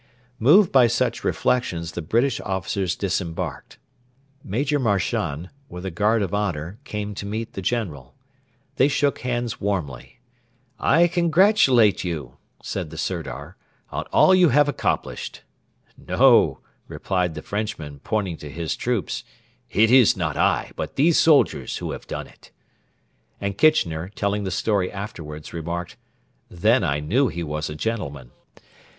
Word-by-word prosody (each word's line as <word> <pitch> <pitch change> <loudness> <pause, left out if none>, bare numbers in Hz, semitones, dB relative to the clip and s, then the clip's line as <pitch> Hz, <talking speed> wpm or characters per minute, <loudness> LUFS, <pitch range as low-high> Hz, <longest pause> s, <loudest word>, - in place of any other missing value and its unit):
Moved 165 - +6
by 130 -3 +6
such 120 +1 -1
reflections 85 -10 0
the 85 - -5
British 115 - +1
officers 95 -1 -2
disembarked. 90 -4 -4 0.7
Major 140 +9 0
Marchand, 95 - -1 0.2
with 90 +1 -8
a 95 - -3
guard 105 +5 +2
of 95 - -4
honour, 95 -1 -2
came 105 -3 -4
to 100 - -6
meet 110 +2 -4
the 95 - -5
General. 85 - -3 0.6
They 135 - +5
shook 145 -1 +1
hands 120 -1 -3
warmly. 90 -11 -3 0.6
'I 170 +1 +4
congratulate 170 - +4
you,' 75 -8 -5 0.3
said 90 -5 -4
the 80 - -10
Sirdar, 80 -5 -5 0.3
'on - - -3
all 185 - +6
you 180 -3 +5
have 145 +2 +4
accomplished.' 145 - -3 0.5
'No,' - - +3 0.3
replied 90 -4 -2
the - - -7
Frenchman, 100 -9 -4
pointing 95 0 -2
to 75 - -9
his 80 +3 -3
troops; 120 -9 -2 0.5
'it 110 +2 +3
is 125 -6 +6
not 80 -4 -2
I, - - +1
but - - -5
these 155 +4 +4
soldiers 155 -3 +3
who - - -4
have - - -8
done - - -5
it.' - - -19 0.9
And 100 -1 -3
Kitchener, 90 - +2
telling 100 0 -2
the - - -1
story 95 0 0
afterwards, 80 -7 -8
remarked, 85 +1 -5 0.5
'Then 110 +8 +2
I 75 -4 0
knew 120 - +2
he 85 -6 -4
was 75 0 -3
a 75 - -6
gentleman.' 75 - -4
100 Hz, 140 wpm, -23 LUFS, 85-120 Hz, 0.9 s, Moved